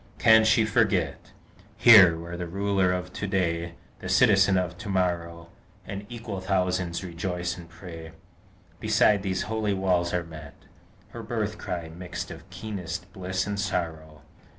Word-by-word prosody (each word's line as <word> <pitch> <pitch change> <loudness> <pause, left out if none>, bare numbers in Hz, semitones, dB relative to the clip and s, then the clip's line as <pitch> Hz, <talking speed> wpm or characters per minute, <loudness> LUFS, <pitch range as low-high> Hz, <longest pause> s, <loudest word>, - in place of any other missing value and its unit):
Can 110 0 +6
she 110 0 +4
forget, 100 -9 0 0.5
Here, 95 -8 +8
where 85 +1 -7
the 90 0 -5
Ruler 95 0 +1
of 90 0 -4
to 100 - -4
day, 85 -3 -1 0.2
The - - -7
Citizen 100 -1 +4
of 90 -1 -2
to 100 - -7
morrow, 85 -3 -2 0.4
And 100 0 -7
equal 115 -5 -6
thousands 90 -2 -1
to - - -7
rejoice 90 +1 -3
and 85 -2 -12
pray 85 -2 -10 0.7
Beside 105 -2 +3
these 95 -1 -2
holy 110 -2 -1
walls 90 -2 +1
are 90 -1 -1
met, 80 -3 -11 0.5
Her - - -8
birth - - -3
cry, 85 -2 -5
mixed 90 +1 -7
of - - -11
keenest 90 -3 -6
bliss 95 0 -2
and 105 -1 -3
sorrow? 80 -5 -4
90 Hz, 150 wpm, -26 LUFS, 85-100 Hz, 0.7 s, Here